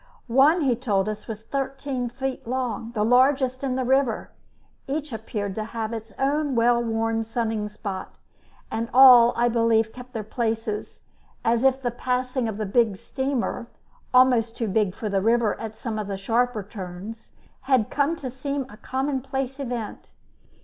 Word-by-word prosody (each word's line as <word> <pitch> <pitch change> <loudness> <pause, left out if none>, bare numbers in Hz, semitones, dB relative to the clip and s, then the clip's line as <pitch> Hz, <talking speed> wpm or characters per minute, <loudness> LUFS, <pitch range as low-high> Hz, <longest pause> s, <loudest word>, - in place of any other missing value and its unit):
One, 275 +8 +4
he 260 -5 +2
told 210 -5 0
us, 215 0 -5
was 220 -1 -6
thirteen 270 -1 -3
feet 265 0 -4
long, 245 -2 -2
the 210 -1 +1
largest 255 +2 +3
in 260 -2 0
the 260 -1 -1
river. 260 -3 +1 0.6
Each 290 -1 -3
appeared 210 -3 -4
to 215 - -3
have 225 0 -4
its 225 -1 -6
own 285 0 0
well 235 +1 +4
worn 225 0 0
sunning 225 -2 -2
spot, 200 -2 -6 0.5
and 230 +1 -2
all, 250 -3 +9
I 240 +1 +3
believe, 230 -1 +2
kept 250 0 -11
their 220 - -3
places, 220 -1 -3 0.4
as 230 +1 +2
if 265 0 +3
the 245 - 0
passing 250 0 -1
of 215 -2 -4
the 215 - -2
big 215 -1 +2
steamer 265 -1 -2 0.4
almost 250 -3 +4
too 230 - -1
big 200 -1 +1
for 220 - -4
the 200 -2 +1
river 230 +1 +3
at 220 -1 -6
some 225 -4 -4
of 210 - -4
the 200 -1 -3
sharper 230 +2 0
turns 195 +2 -8 0.4
had 255 -6 +3
come 290 +3 +1
to 265 -6 -6
seem 275 +2 -3
a 210 - -12
commonplace 270 +1 -3
event. 240 -5 -5
235 Hz, 165 wpm, -25 LUFS, 220-260 Hz, 0.6 s, all